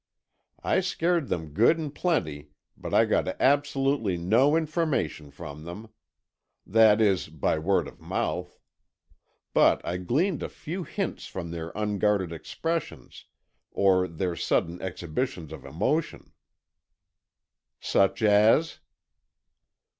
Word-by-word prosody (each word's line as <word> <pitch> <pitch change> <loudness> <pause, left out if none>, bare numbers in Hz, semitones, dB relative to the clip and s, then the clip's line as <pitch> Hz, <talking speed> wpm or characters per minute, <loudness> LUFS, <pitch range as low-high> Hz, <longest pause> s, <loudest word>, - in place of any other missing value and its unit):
I - - +2
scared 175 -4 0
them 80 -3 -3
good 115 - +4
and 150 -3 -5
plenty 75 - -1 0.3
but - - -7
I - - +5
got - - +1
absolutely 135 -7 +2
no 115 - +3
information 155 - -1
from 70 +1 -9
them. 90 +7 -8 0.8
That 110 +1 +5
is, 100 -4 +2
by 80 0 -1
word 95 +5 +1
of - - -14
mouth. 90 0 -3 1.0
But - - +5
I 90 - -2
gleaned 145 - 0
a - - -4
few 175 +5 -6
hints 195 +2 -4
from 85 -3 -6
their 85 -1 -5
unguarded 105 -3 0
expressions, 165 - -5 0.4
or 95 -2 +3
their 85 +1 -3
sudden 85 +1 -1
exhibitions 90 - -4
of 70 -4 -10
emotion." 105 - -2 1.5
"Such 100 +3 +1
as?" 110 +9 +4
105 Hz, 115 wpm, -27 LUFS, 85-145 Hz, 1.5 s, I